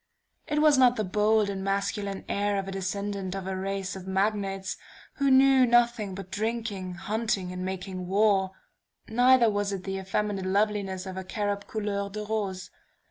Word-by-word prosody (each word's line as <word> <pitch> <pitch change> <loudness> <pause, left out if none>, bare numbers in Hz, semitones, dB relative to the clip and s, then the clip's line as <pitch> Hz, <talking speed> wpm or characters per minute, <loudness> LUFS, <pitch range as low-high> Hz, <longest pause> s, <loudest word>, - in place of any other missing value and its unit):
It 300 0 +1
was 295 -3 +6
not 250 -1 +6
the 215 - -1
bold 210 +2 +2
and 195 -1 -4
masculine 200 0 -2
air 205 0 0
of 195 -1 -3
a - - -4
descendant 195 0 -3
of 195 -1 -5
a 190 0 -3
race 195 0 -3
of 190 -1 -9
Magnates, 195 0 -1 0.4
who 280 -1 +2
knew 265 0 +6
nothing 235 -5 +2
but 195 -1 -8
drinking, 210 -3 -3
hunting 200 -1 -2
and 180 0 -5
making 185 -1 -5
war; 195 -1 +3 0.6
neither 245 +1 +5
was 205 -1 0
it 195 -2 -4
the 195 0 -3
effeminate 195 0 -2
loveliness 200 -1 0
of 190 0 -6
a 190 - -4
cherub 205 +1 -3
couleur 205 -2 -2
de 210 +1 -5
rose. 200 -4 -3
200 Hz, 170 wpm, -27 LUFS, 190-215 Hz, 0.6 s, was